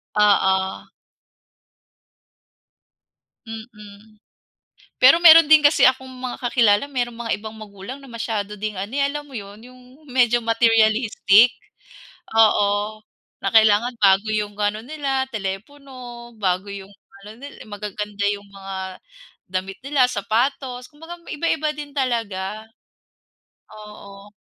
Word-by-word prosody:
Oo. 190 Hz, -2 st, +2 dB, 2.6 s
Mm, 215 Hz, -1 st, -12 dB, 0.8 s
pero 260 Hz, +5 st, +8 dB
meron 330 Hz, -2 st, +8 dB
din 310 Hz, -1 st, +6 dB
kasi 290 Hz, -2 st, +6 dB
akong 260 Hz, 0 st, -3 dB
mga 255 Hz, -1 st, -6 dB
kakilala 230 Hz, -2 st, +3 dB
meron 240 Hz, -3 st, -3 dB
mga 235 Hz, -1 st, -3 dB
ibang 220 Hz, +1 st, -9 dB
magulang 205 Hz, +3 st, -10 dB
na 280 Hz, -, -16 dB
masyado 225 Hz, -4 st, -4 dB
ding 210 Hz, -1 st, -4 dB
ano, 200 Hz, +4 st, -6 dB
eh, 280 Hz, -, -1 dB
alam 295 Hz, +1 st, -5 dB
mo 290 Hz, -, -18 dB
yun 205 Hz, -4 st, -8 dB
yung 255 Hz, 0 st, -16 dB, 0.2 s
medyo 240 Hz, -3 st, +1 dB
materialistic 225 Hz, 0 st, +3 dB, 0.8 s
oo, 215 Hz, -1 st, +2 dB, 0.4 s
na 195 Hz, -, -1 dB
kailangan 220 Hz, +2 st, +4 dB
bago 195 Hz, -1 st, +4 dB
yung 210 Hz, -1 st, -2 dB
ano 205 Hz, +1 st, -1 dB
nila 270 Hz, +1 st, -3 dB
telepono, 240 Hz, +3 st, -8 dB
bago 190 Hz, 0 st, -1 dB
yung 195 Hz, -1 st, -8 dB, 0.4 s
ano 210 Hz, +2 st, -11 dB
nil 280 Hz, +4 st, -12 dB
magaganda 210 Hz, 0 st, -6 dB
yung 205 Hz, 0 st, -7 dB
mga 195 Hz, -1 st, -9 dB, 0.8 s
damit 190 Hz, +1 st, -4 dB
nila 275 Hz, -2 st, +2 dB
sapatos, 250 Hz, +3 st, -2 dB
kumbaga 325 Hz, +3 st, -12 dB
iba-iba 305 Hz, -1 st, -2 dB
din 295 Hz, -1 st, -8 dB
talaga, 220 Hz, -7 st, -3 dB, 1.1 s
oo. 210 Hz, -1 st, -13 dB
220 Hz, 115 wpm, -21 LUFS, 205-260 Hz, 2.6 s, pero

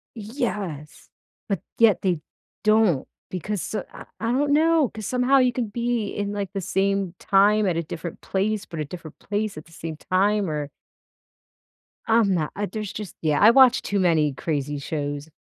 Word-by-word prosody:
Yes, 210 Hz, -, -5 dB, 0.4 s
but 195 Hz, -5 st, -1 dB, 0.2 s
yet 225 Hz, -4 st, +5 dB
they 180 Hz, -5 st, +1 dB, 0.4 s
don't, 215 Hz, -9 st, +3 dB, 0.2 s
because, 190 Hz, +3 st, -4 dB
uh -, -, -2 dB
I -, -, -11 dB
I 230 Hz, +1 st, -1 dB
don't 285 Hz, +3 st, +1 dB
know, 320 Hz, -2 st, +4 dB
'cause 215 Hz, -1 st, -8 dB
somehow 255 Hz, +2 st, +3 dB
you 255 Hz, -2 st, +3 dB
could 235 Hz, -4 st, -3 dB
be 235 Hz, -2 st, -1 dB
in, 205 Hz, 0 st, -3 dB
like, 200 Hz, -2 st, -3 dB
the 195 Hz, -, -2 dB
same 195 Hz, 0 st, 0 dB
time 205 Hz, +2 st, +4 dB
at 180 Hz, -4 st, +1 dB
a 170 Hz, -, -1 dB
different 165 Hz, +2 st, -7 dB
place, 200 Hz, +1 st, -1 dB
but 165 Hz, -3 st, -8 dB
a 150 Hz, -, -1 dB
different 160 Hz, 0 st, -10 dB
place 205 Hz, -3 st, -3 dB
at 155 Hz, -, -8 dB
the 165 Hz, -, -20 dB
same 165 Hz, -1 st, -6 dB
time, 195 Hz, +1 st, +1 dB
or 150 Hz, -1 st, -3 dB, 1.4 s
I'm 220 Hz, -4 st, +4 dB
not 155 Hz, -4 st, -1 dB
uh, 205 Hz, -, -1 dB
there's 215 Hz, -2 st, -5 dB
just 210 Hz, -4 st, -7 dB
yeah, 155 Hz, -2 st, +1 dB
I 215 Hz, -, +8 dB
watch 260 Hz, 0 st, +6 dB
too 200 Hz, -1 st, -1 dB
many 160 Hz, -5 st, +3 dB
crazy 145 Hz, 0 st, -2 dB
shows. 145 Hz, 0 st, -4 dB
200 Hz, 180 wpm, -24 LUFS, 165-220 Hz, 1.4 s, I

